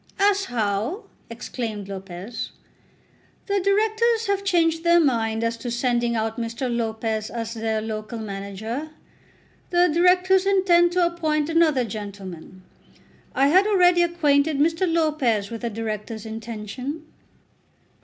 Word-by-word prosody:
"As 395 0 +3
how?" 225 - -2 0.3
exclaimed 230 -3 -5
Lopez. 190 +2 -6 1.0
"The 400 -1 0
Directors 440 +4 +2
have 400 0 0
changed 330 -4 +2
their 340 0 +5
mind 230 -7 +1
as 230 0 -1
to 240 - -5
sending 240 -1 0
out 225 +1 -2
Mr. 235 +2 -3
Lopez 220 -1 -2
as 230 -1 -4
their 220 -1 -2
local 220 +1 -5
manager. 215 +6 -5 0.8
The 355 0 +4
Directors 365 +3 +3
intend 355 -3 +4
to 360 -1 +3
appoint 315 -3 0
another 320 -6 +3
gentleman. 195 -4 -8 0.7
I 275 +1 +4
had 375 +6 +5
already 360 -4 +4
acquainted 310 -4 +2
Mr. 330 +4 +1
Lopez 285 -11 +1
with 230 - -6
the 235 - -2
Directors' 220 0 -5
intention." 225 +7 -6
250 Hz, 125 wpm, -23 LUFS, 220-345 Hz, 1.0 s, their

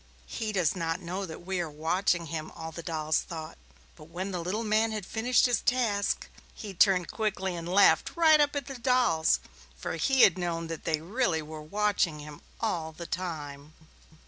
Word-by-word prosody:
"He 220 -2 -4
does 185 -4 +1
not 165 -1 -2
know 185 +2 -4
that 165 +1 -9
we 190 -1 -2
are 170 -2 -2
watching 170 +3 0
him," 155 0 -5 0.2
the 170 - -6
dolls 155 -2 -1
all 170 - -5
thought, - - -20 0.4
but 155 - -13
when 180 +5 -5
the 180 -2 -3
little 195 +7 -2
man 220 +1 +2
had 215 -3 -4
finished 235 +4 +2
his 245 -2 +2
task, 225 -5 0 0.3
he 205 -3 -7
turned 185 -1 +3
quickly 195 -4 -2
and 170 0 -6
laughed 200 +3 +4
right 320 -2 +6
up 290 0 +2
at 285 -2 -2
the 270 -2 -8
dolls, 235 -11 +3 0.4
for 70 - -4
he 265 - +3
had 185 -1 +6
known 170 -2 -2
that 165 -2 -6
they 155 -2 +1
were 160 -6 -2
watching 200 -1 0
him 150 0 -10 0.2
all 170 -8 -2
the 170 +2 -8
time. 155 -5 -5
180 Hz, 185 wpm, -29 LUFS, 160-215 Hz, 0.4 s, right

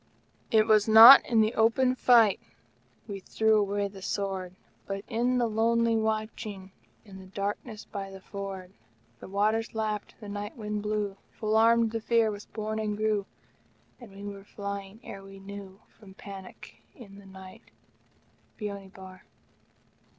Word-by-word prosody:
It 220 -1 +4
was 215 -1 +4
not 225 +5 +11
in 230 -2 +3
the 215 +2 +1
open 235 +3 +3
fight 235 -5 +4 0.7
We 200 -2 -6
threw 220 +3 +1
away 200 0 -1
the 195 -1 -12
sword, 190 -2 -4 0.3
But 195 0 -4
in 245 +2 0
the 245 - +2
lonely 230 +1 +1
watching 215 -3 -3 0.3
In 195 -2 -12
the 190 - -12
darkness 205 +3 -5
by 195 -2 -6
the 195 0 -10
ford. 195 -1 -8 0.5
The - - -10
waters 215 +4 0
lapped, 215 -2 -3
the 210 - -10
night 205 +2 -6
wind 210 -1 -4
blew, 210 -1 -2 0.2
Full 215 -1 -2
armed 230 0 +4
the 225 0 -3
Fear 230 -1 +2
was 205 0 -9
born 215 0 -4
and 210 -1 -2
grew, 215 -2 0 0.7
And 240 -5 -13
we 195 +1 -11
were 200 -1 -8
flying 200 0 -7
ere 195 - -9
we 195 0 -13
knew 195 0 -10 0.2
From 195 -3 -15
panic 195 -2 -11
in 200 -6 -13
the 200 - -15
night. 190 -1 -13 0.9
Beoni 200 -2 -6
Bar. 190 -1 -13
210 Hz, 155 wpm, -28 LUFS, 195-220 Hz, 0.9 s, not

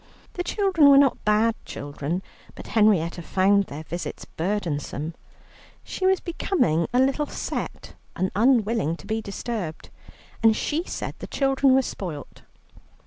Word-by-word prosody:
The 355 - -3
children 360 -6 +3
were 275 - +8
not 275 -2 +3
bad 215 +2 +3
children, 145 +5 -4 0.3
but - - -10
Henrietta 190 -6 +3
found 195 +3 +3
their 150 0 -8
visits 175 +2 -6
burdensome. 165 -4 -3 0.7
She 375 - -2
was 380 0 +3
becoming 320 - 0
a 250 - +1
little 275 +3 +2
set - - -5 0.2
and 185 - -1
unwilling 225 - +2
to - - -14
be 220 0 -2
disturbed, 200 -5 -5 0.5
and 225 -1 +5
she 310 +8 -1
said - - -5
the - - -7
children 270 -1 +3
were 265 - +4
spoilt. 165 - -7
215 Hz, 140 wpm, -24 LUFS, 170-270 Hz, 0.7 s, were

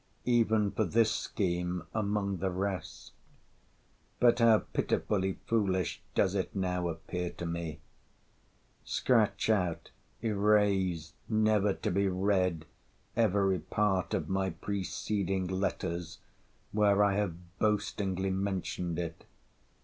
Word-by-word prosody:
Even 110 -4 +3
for 110 - 0
this 110 +3 +3
scheme 90 -5 -1
among 100 -2 0
the 95 +2 -1
rest! 95 +1 -4 1.1
But 120 0 +5
how 115 -2 +7 0.2
pitifully 95 -2 0
foolish 95 -6 0
does 95 - +3
it 95 0 -2
now 90 -2 0
appear 85 +2 -4
to 85 - -6
me!—Scratch 85 +7 -3
out, 90 -6 -1 0.3
erase, 100 -6 +2 0.2
never 110 -2 +3
to - - -2
be 100 +2 +2
read, 90 -3 +1 0.5
every 100 -4 +2
part 95 +1 0
of - - -2
my 95 0 0
preceding 95 +1 -2
letters, 90 -2 -2 0.5
where 105 -1 +4
I 100 -1 +3
have 90 -2 -4
boastingly 100 -3 0
mentioned 95 -3 -2
it. 85 -1 -5
95 Hz, 105 wpm, -31 LUFS, 90-105 Hz, 1.1 s, how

